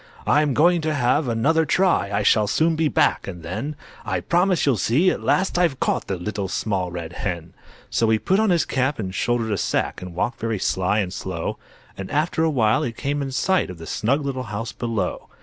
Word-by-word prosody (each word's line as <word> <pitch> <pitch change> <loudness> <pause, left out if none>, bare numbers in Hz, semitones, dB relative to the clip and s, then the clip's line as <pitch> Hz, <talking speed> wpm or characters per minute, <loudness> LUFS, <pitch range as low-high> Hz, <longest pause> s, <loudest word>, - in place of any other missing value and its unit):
"I'm 150 -3 +3
going 170 +2 +4
to 155 -1 -1
have 140 +2 +2
another 140 +8 +2
try, 175 - +2
I 100 +1 0
shall 105 0 +4
soon 160 +9 +2
be 160 0 +1
back, 145 - +1
and 90 -4 -7
then 145 - -4 0.3
I - - -1
promise 180 +1 +2
you'll 135 -5 +3
see 145 - +3
at - - -4
last 190 -1 +1
I've 165 -7 +1
caught - - 0
The 95 - -2
Little 100 +2 -3
Small 95 -1 -1
Red 85 -1 -6
Hen." 85 -4 -4 0.4
So 115 - +2
he 110 - +4
put 190 - +1
on 220 -1 +3
his 170 -4 +3
cap 135 +2 0
and 95 -4 -4
shouldered 115 +1 0
a 100 - 0
sack, - - -1
And 90 -2 -8
walked 120 +8 -2
very 115 -1 -1
sly 95 +2 +1
and 90 -2 -4
slow; 90 -4 -4 0.4
And 95 - -7
after 160 +2 0
a 165 - +3
while 115 -7 +2
he 120 - -1
came 145 +5 -3
in 135 -1 -3
sight 185 - +1
Of 90 - -8
the 80 - -9
snug 140 - 0
little 130 -2 -3
house 110 +2 -4
below. 115 -6 -3
120 Hz, 220 wpm, -23 LUFS, 100-155 Hz, 0.4 s, going